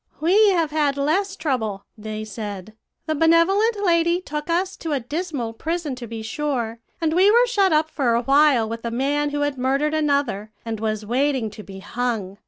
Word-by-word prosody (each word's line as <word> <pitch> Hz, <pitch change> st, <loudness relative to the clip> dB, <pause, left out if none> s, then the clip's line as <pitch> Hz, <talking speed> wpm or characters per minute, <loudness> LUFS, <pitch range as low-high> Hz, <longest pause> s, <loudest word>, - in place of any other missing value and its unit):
"'We 400 Hz, +7 st, +5 dB
have 330 Hz, -4 st, 0 dB
had 295 Hz, -2 st, +1 dB
less 375 Hz, +8 st, 0 dB
trouble,' 225 Hz, -, -2 dB
they 215 Hz, 0 st, -6 dB
said. 205 Hz, -1 st, -7 dB, 0.3 s
'The 315 Hz, -, 0 dB
benevolent 335 Hz, +8 st, +3 dB
lady 340 Hz, 0 st, +3 dB
took 300 Hz, -3 st, -6 dB
us 365 Hz, +3 st, 0 dB
to 320 Hz, -2 st, -3 dB
a 280 Hz, -, +1 dB
dismal 280 Hz, -3 st, -4 dB
prison, 320 Hz, +3 st, -3 dB
to 240 Hz, -2 st, -7 dB
be 225 Hz, 0 st, -6 dB
sure, 235 Hz, -2 st, -3 dB, 0.2 s
and 320 Hz, -2 st, 0 dB
we 375 Hz, +4 st, +5 dB
were 475 Hz, +3 st, +5 dB
shut 405 Hz, -6 st, +2 dB
up 310 Hz, 0 st, +3 dB
for 260 Hz, -7 st, 0 dB
a 235 Hz, -, 0 dB
while 275 Hz, -3 st, +4 dB
with 230 Hz, +1 st, -6 dB
a 235 Hz, -, -2 dB
man 285 Hz, +5 st, 0 dB
who 290 Hz, 0 st, -2 dB
had 290 Hz, -2 st, -1 dB
murdered 275 Hz, +4 st, +1 dB
another, 280 Hz, -9 st, 0 dB, 0.2 s
and 225 Hz, -2 st, -4 dB
was 215 Hz, -1 st, -2 dB
waiting 255 Hz, -1 st, 0 dB
to 210 Hz, -, -10 dB
be 195 Hz, -2 st, -10 dB
hung. 210 Hz, -3 st, -3 dB
285 Hz, 190 wpm, -22 LUFS, 225-325 Hz, 0.3 s, We